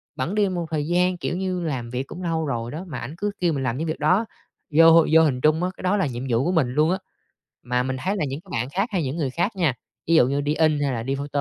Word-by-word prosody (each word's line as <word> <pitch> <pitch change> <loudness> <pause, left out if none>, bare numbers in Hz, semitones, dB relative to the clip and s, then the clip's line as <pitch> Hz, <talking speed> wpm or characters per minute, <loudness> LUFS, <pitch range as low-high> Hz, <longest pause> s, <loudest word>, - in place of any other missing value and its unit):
bẵng 170 +11 -2
đi 205 -2 +2
một 175 -2 -3
thời 150 -1 -1
gian, 180 +1 +2
kiểu 175 +1 -3
như, 185 -1 -2
làm 130 -8 -3
việc 125 +2 -3
cũng 180 - -8
lâu 160 -2 -1
rồi 120 -3 -3
đó, 165 +5 -6
mà 145 -7 -5
ảnh 135 +7 -7
cứ 205 +1 -1
kêu 175 -3 +1
mình 135 -2 -2
làm 125 -1 -1
những 160 +3 -2
việc 155 - -3
đó, 180 +9 +3 0.5
vô 165 +1 +7
vô 160 - +8
hình 130 -5 +1
trung 155 +4 +3
á, 180 - +1
cái - - -10
đó 185 +3 +2
là 190 - +1
nhiệm 125 0 -5
vụ 120 +2 +2
của 180 - +1
mình 160 -8 +2
luôn 150 +6 +2
á. 185 - +1 0.7
Mà 125 +1 0
mình 130 0 -2
thấy 195 +6 -1
là 155 - 0
những 140 +2 -5
cái 190 - -21
bạn 120 +3 -2
khác 195 - -1
hay 180 -6 0
những 135 +3 -3
người 140 -5 -1
khác 175 - -1
nha, 165 -9 +1 0.3
ví 165 - +4
dụ 125 - +6
như 140 +2 0
đi 145 +1 -1
in 155 -2 +2
hay 140 -1 0
là 115 -1 -3
đi 135 +2 -1
photo 140 +1 -5
155 Hz, 305 wpm, -23 LUFS, 135-180 Hz, 0.7 s, vô